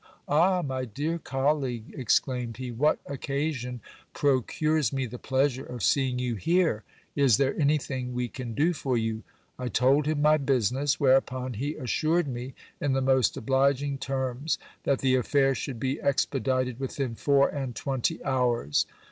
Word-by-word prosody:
Ah, 180 +4 +3
my 130 -2 -2
dear 145 +8 -3
colleague! 135 -5 -1
exclaimed 125 -1 0
he, 130 -1 -5
what 145 +6 +2
occasion 140 -3 -3 0.3
procures 145 +1 +1
me 135 -1 -1
the 120 0 -8
pleasure 130 0 0
of 125 -4 -7
seeing 130 -3 +2
you 125 -1 -1
here! 165 - +1 0.3
Is 135 -7 +4
there 135 -1 +1
anything 140 -4 0
we 125 0 -1
can 120 -3 -7
do 160 +5 +2
for 135 -5 -1
you? 110 -1 -2 0.4
I 125 - -3
told 135 +5 +3
him 155 -1 0
my 150 +1 +5
business; 135 0 +1
whereupon 130 -1 +2
he 140 +8 -3
assured 155 +6 0
me, 125 0 -6 0.2
in 145 -2 0
the 135 - +1
most 130 -2 +2
obliging 135 +3 +1
terms, 135 +2 -2 0.3
that 140 -2 +1
the 130 -1 +3
affair 135 +2 +3
should 130 -2 -5
be 130 +2 -2
expedited 130 -2 0
within 135 -2 -3
four 140 +3 +3
and 135 -5 -4
twenty 135 +4 -2
hours. 125 - +1
135 Hz, 155 wpm, -27 LUFS, 125-145 Hz, 0.4 s, my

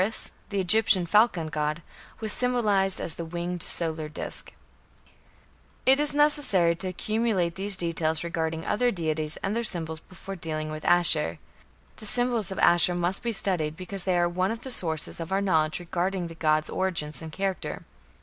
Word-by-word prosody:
Horus, 215 +4 -1 0.2
the 200 - -2
Egyptian 190 -1 +4
falcon 180 -4 +2
god, 150 +1 -2 0.4
was 215 -1 0
symbolized 210 -7 +1
as 160 - -3
the 170 - -6
winged 175 +1 -5
solar 160 -2 0
disc. 150 - -5 1.3
It 265 +2 +5
is 295 -1 +1
necessary 280 - +2
to 185 - -4
accumulate 200 -2 -1
these 195 +1 +2
details 165 -2 -1
regarding 160 -1 -3
other 245 +3 +1
deities 155 -6 -2
and 195 +2 -1
their 235 - -1
symbols 160 -6 -3
before 190 +3 -10
dealing 155 -3 -4
with 155 0 -7
Ashur. 160 - +5 0.6
The 215 - -5
symbols 245 -4 +2
of 190 - -6
Ashur 175 +1 +4
must 175 +2 -1
be 235 -1 -2
studied, 175 -7 -1
because 185 +1 -1
they 185 -2 +1
are 175 0 +2
one 185 +2 -1
of 225 +1 -4
the 265 - -6
sources 160 -9 0
of 165 +2 -6
our 195 - +1
knowledge 160 -6 +1
regarding 180 +1 -2
the - - -9
god's 155 -1 +1
origin 170 -5 -1
and 160 -1 -8
character. 195 +3 -4
175 Hz, 170 wpm, -26 LUFS, 160-200 Hz, 1.3 s, It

